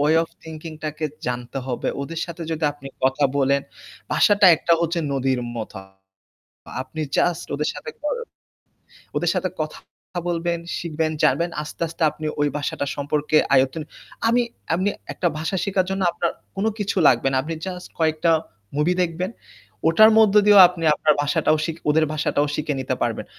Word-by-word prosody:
Way 150 +3 +4
of 165 - -6
thinking 160 0 -8
টাকে 155 +1 -3 0.2
জানতে 125 +1 -3
হবে। 125 -2 -2
ওদের 165 +3 -5
সাথে 170 0 -7
যদি 160 -1 -2
আপনি 140 -1 -11
কথা 135 +2 +2
বলেন, 140 0 +3 0.5
বাসাটা 205 -2 +5
একটা 170 +2 +1
হচ্ছে 170 +1 0
নদীর 130 -1 0 0.2
মত। 110 - -5
আ - - -11 1.0
আপনি 145 +4 -8 0.2
জাস্ট 175 -1 +1
ওদের 150 +2 -1
সাথে 460 - -7
কর 300 +10 -1 1.0
ওদের - - +2
সাথে - - 0
কথা - - -3 0.5
বলবেন, 170 0 -1 0.2
শিখবেন, 160 -1 -2
জানবেন। 170 +1 +2
আস্তে, 150 - -8
আস্তে 165 +1 -6
আপনি 155 - -7
ওই 145 - +3
ভাষাটা 145 -1 -2
সম্পর্কে 145 +1 0 0.2
আয়তন 135 +4 +2 0.5
আমি 240 +1 +3 0.3
আমনি 190 +4 +1 0.2
একটা 175 - 0
ভাষা 165 +5 -2
শিখার 190 -2 +1
জন্য 195 0 -1
আপনার 170 - -1 0.3
কোন 195 - -1
কিছু 200 -1 -2
লাগবে 125 +1 +3
না। 135 - 0
আপনি 165 +4 -4
জাস্ট 180 -1 -6
কয়েকটা 160 +1 +2 0.5
মুভি 150 +4 +2
দেখবেন। 175 +2 -2 0.6
ওটার 215 +7 +7
মধ্য 215 -2 +5
দিয়েও 205 -1 +8
আপনি 175 -2 -6
আপনার 150 0 +3
ভাষাটাও 145 +1 +2
শিখ 165 -1 -3
ওদের 155 +1 +4
ভাষাটাও 150 -1 +1
শিখে 150 -1 -2
নিতে 130 - -1
পারবেন। - - -1
160 Hz, 165 wpm, -22 LUFS, 145-175 Hz, 1.0 s, দিয়েও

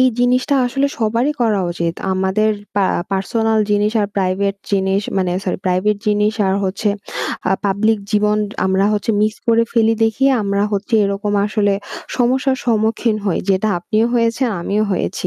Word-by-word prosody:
এই 255 - +6
জিনিসটা 250 +3 +2
আসলে 275 +3 0
সবারই 230 +6 +1
করা 215 -4 +2
উচিত। 170 -1 -2 0.2
আমাদের 190 +3 +1 0.3
পা 200 - +3 0.3
পারসোনাল 220 +3 0
জিনিস 210 +1 +2
আর 205 - +1
প্রাইভেট 195 +1 0 0.2
জিনিস 195 0 +1 0.2
মানে 185 -2 +1
সরি 180 - -2
প্রাইভেট 185 +3 +1
জিনিস 210 +1 +2
আর 190 - +1
হচ্ছে 195 +2 -1 0.6
আ - - +4
পাব্লিক 210 +3 +1
জীবন 210 0 +2 0.3
আমরা 190 +1 +2
হচ্ছে 210 +2 0
মিস্ক 215 0 0
করে 230 0 +4
ফেলি 225 -1 +3
দেখেই 265 +5 +2
আমরা 200 0 0
হচ্ছে 205 +4 -1
এরকম 200 +1 -2
আসলে 205 -1 +1 0.4
সমস্যার 260 +2 +2
সম্মুখীন 220 0 +1
হই। 190 - 0
যেটা 195 +3 +1
আপনিও 215 +6 0
হয়েছেন, 235 +2 +1
আমিও 205 +4 0
হয়েছি। 185 0 -2
210 Hz, 155 wpm, -18 LUFS, 195-225 Hz, 0.6 s, এই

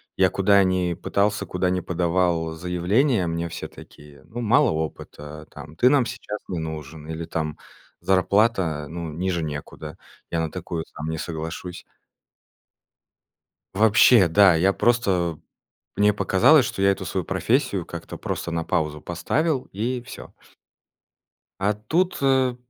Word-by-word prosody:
я 95 -1 +4
куда 100 +1 +4
ни 90 -2 0
пытался, 100 +4 -1
куда 90 0 -1
ни 90 - 0
подавал 85 -1 0
заявления— 90 - +1
мне 85 +1 -2
все 85 - -6
такие: 75 -1 -15
"Ну, 120 +2 -7
мало 125 +4 +4
опыта,- 75 -1 -6
там,- 75 - -11
ты 125 - +4
нам 135 -3 +3
сейчас 105 -2 -6
не 90 - -3
нужен", 80 -1 -7
или, 80 +1 -5
там, 80 -2 -3 0.4
зарплата, 95 -5 +1
ну, 85 0 -6
ниже 85 +2 -2
некуда- 75 +1 -7 0.3
я 85 - -1
на 80 -1 -2
такую 85 -2 -5
сам 75 +1 -7
не 80 - -3
соглашусь. 80 +2 -6 1.9
Вообще, 110 -1 +6
да, 95 +1 +6
я 90 +4 +3
просто 95 -8 +1 0.6
мне 105 0 +4
показалось, 120 +8 +4
что - - -4
я 100 0 +5
эту 95 -1 -4
свою 90 +1 -2
профессию 100 - 0
как-то 85 -1 -8
просто 85 - -4
на 85 -1 -2
паузу 75 -2 -1
поставил 130 - -1
и 120 +5 -2
всё. - - -10 1.3
А 100 +2 +2
тут, 160 - -1
э 130 -2 +2
90 Hz, 140 wpm, -23 LUFS, 80-105 Hz, 1.9 s, Вообще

